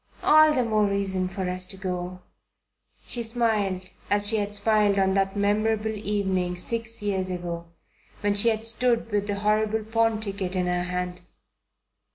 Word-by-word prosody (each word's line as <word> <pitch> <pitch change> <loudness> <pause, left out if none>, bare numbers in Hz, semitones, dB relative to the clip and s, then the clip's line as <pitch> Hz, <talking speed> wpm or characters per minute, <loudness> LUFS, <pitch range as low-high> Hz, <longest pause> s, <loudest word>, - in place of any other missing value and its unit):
"All 310 0 +7
the 260 -4 +1
more 215 -2 +2
reason 195 -2 -1
for 190 0 -4
us 185 0 -1
to 195 - -8
go." 180 -1 -4 0.8
She 240 - +1
smiled 220 -5 0 0.2
as 205 0 +3
she 220 +1 +2
had 205 -1 -2
smiled 205 -1 +2
on 190 -1 +2
that 195 +1 0
memorable 215 +2 +1
evening 190 -4 -1
six 230 +4 -4
years 190 -2 -1
ago 175 -2 -5 0.5
when 205 0 +1
she 205 +3 +4
had 220 0 -1
stood 230 0 +1
with 205 0 0
the 200 -1 -3
horrible 215 +1 +1
pawn 225 0 +1
ticket 195 -3 -3
in 180 -1 0
her 180 0 0
hand. 180 0 -4
205 Hz, 165 wpm, -25 LUFS, 185-220 Hz, 0.8 s, All